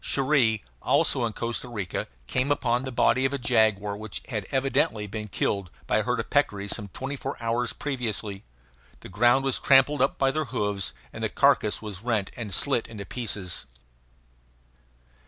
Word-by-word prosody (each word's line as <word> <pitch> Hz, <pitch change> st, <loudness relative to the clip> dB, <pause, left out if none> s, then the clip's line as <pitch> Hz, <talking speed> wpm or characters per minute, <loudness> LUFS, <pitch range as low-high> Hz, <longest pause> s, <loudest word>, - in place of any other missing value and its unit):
Cherrie, 130 Hz, -6 st, +2 dB, 0.2 s
also 120 Hz, -, +3 dB
in 110 Hz, -, -5 dB
Costa 120 Hz, +2 st, -3 dB
Rica, 100 Hz, -7 st, -3 dB, 0.2 s
came 130 Hz, -, 0 dB
on 125 Hz, -2 st, +1 dB
the 130 Hz, -, -4 dB
body 125 Hz, +1 st, +3 dB
of 135 Hz, +1 st, +1 dB
a -, -, 0 dB
jaguar 110 Hz, -5 st, +2 dB
which 110 Hz, 0 st, -6 dB
had 105 Hz, -6 st, -3 dB
evidently 130 Hz, -6 st, +1 dB
been 105 Hz, +1 st, -5 dB
killed 100 Hz, -1 st, -1 dB, 0.2 s
by -, -, +2 dB
a -, -, +3 dB
herd -, -, -1 dB
of -, -, -4 dB
peccaries 100 Hz, 0 st, +1 dB
some 105 Hz, -3 st, -5 dB
twenty 135 Hz, +8 st, -5 dB
four 135 Hz, 0 st, -5 dB
hours 115 Hz, +1 st, 0 dB
previously. 110 Hz, -7 st, -3 dB, 0.6 s
The -, -, -10 dB
ground 120 Hz, +7 st, +3 dB
was 135 Hz, -, +1 dB
trampled 140 Hz, +1 st, +5 dB
up 135 Hz, -, +2 dB
by 135 Hz, -1 st, +3 dB
their 155 Hz, +2 st, -1 dB
hoofs, 105 Hz, -6 st, -2 dB, 0.2 s
and -, -, -6 dB
the -, -, +1 dB
carcass 105 Hz, +1 st, +2 dB
was 100 Hz, -3 st, -6 dB
rent 110 Hz, -4 st, -1 dB
and 110 Hz, -4 st, -6 dB
slit 120 Hz, +6 st, +1 dB
into 105 Hz, -3 st, -8 dB
pieces. 100 Hz, -6 st, -4 dB
115 Hz, 175 wpm, -26 LUFS, 105-130 Hz, 0.6 s, trampled